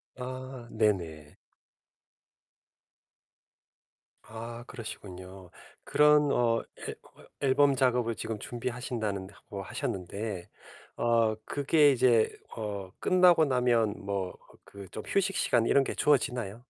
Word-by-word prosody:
아, 130 -1 -7
네, 110 -1 +4
네. 80 -5 -9 2.9
아, 115 +2 -8
그러시군요. 95 -5 -9 0.3
그런 150 -1 +4
어 115 -3 +2 0.2
앨 - - -6
어 - - -19 0.2
앨범 140 0 +4
작업을 125 -3 +1
지금 110 0 -4
준비하신다는 120 -5 -4
하고 100 0 -9
하셨는데 95 0 -4 0.5
어 115 -2 +2
그게 145 +1 +4
이제 120 -4 +3 0.2
어 100 -4 -5
끝나고 180 -3 +5
나면 120 -5 +2
뭐 100 -2 -2 0.3
그 100 -1 -11
좀 110 - -6
휴식 195 0 0
시간 115 -2 +2
이런 140 +2 +4
게 - - -4
주어지나요? 125 -7 +1
115 Hz, 210 characters per minute, -29 LUFS, 100-130 Hz, 2.9 s, 끝나고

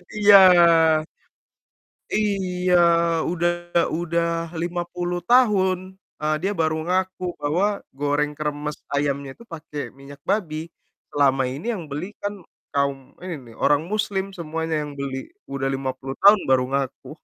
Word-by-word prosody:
Iya. 205 -1 +8 1.8
Iya, 185 -4 0 0.6
udah 175 0 +1 0.5
udah 170 0 0 0.4
50 175 0 -3
tahun, 205 -7 +4 0.4
eee, 155 0 +1
dia 195 +3 0
baru 160 -1 +2
ngaku 185 0 -1 0.2
bahwa 160 +7 +1 0.3
goreng 145 +1 0
kremes 150 0 -3 0.2
ayamnya 140 -1 -1
tuh - - -12
pakai 150 -2 -6 0.2
minyak 140 +1 -12
babi. 165 -5 -1 0.4
Selama 135 -2 +3
ini 140 +9 -7
yang 180 - -6
beli 150 +6 -4 0.2
kan 205 0 -1 0.4
kaum 140 -1 0 0.3
ini 185 -1 -4 0.2
nih, - - -15
orang 145 0 +4
muslim 205 -2 -1
semuanya 160 -1 -3
yang - - -8
beli, 135 -1 -3 0.3
udah 135 -1 -2
50 135 0 -5
tahun 205 +1 +8
baru 130 -1 +4
ngaku. 135 -1 -3
160 Hz, 125 wpm, -23 LUFS, 145-185 Hz, 1.8 s, Iya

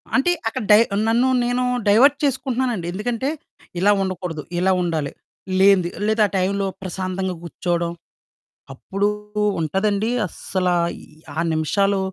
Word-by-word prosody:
అంటే, 275 +7 +3 0.2
అక్కడ 225 - -2
డై 210 - +9 0.3
నన్ను, 235 +3 +3 0.2
నేనూ 245 +1 0 0.2
డైవర్ట్ 270 +8 +6
చేసుకుంటన్నానండి. 255 -8 -1
ఎందుకంటే, 235 +7 -2 0.5
ఇలా 205 +3 +4
ఉండకూడదు, 180 -4 -4 0.2
ఇలా 190 +1 +3
ఉండాలి, 160 -5 -1 0.5
లేనిది 190 -3 +5 0.2
లేదా 220 0 +3
ఆ - - -14
టైంలో 195 +2 0 0.2
ప్రశాంతంగా 185 0 -3
కూర్చోడం. 170 0 -2 0.8
అప్పుడూ 195 +9 -1 0.5
ఉంటదండీ 200 +7 0 0.2
అస్సలా, 180 0 -1 0.3
ఈ - - -14 0.3
ఆ - - +1
నిమిషాలు 195 +6 +1
195 Hz, 120 wpm, -21 LUFS, 180-225 Hz, 0.8 s, డై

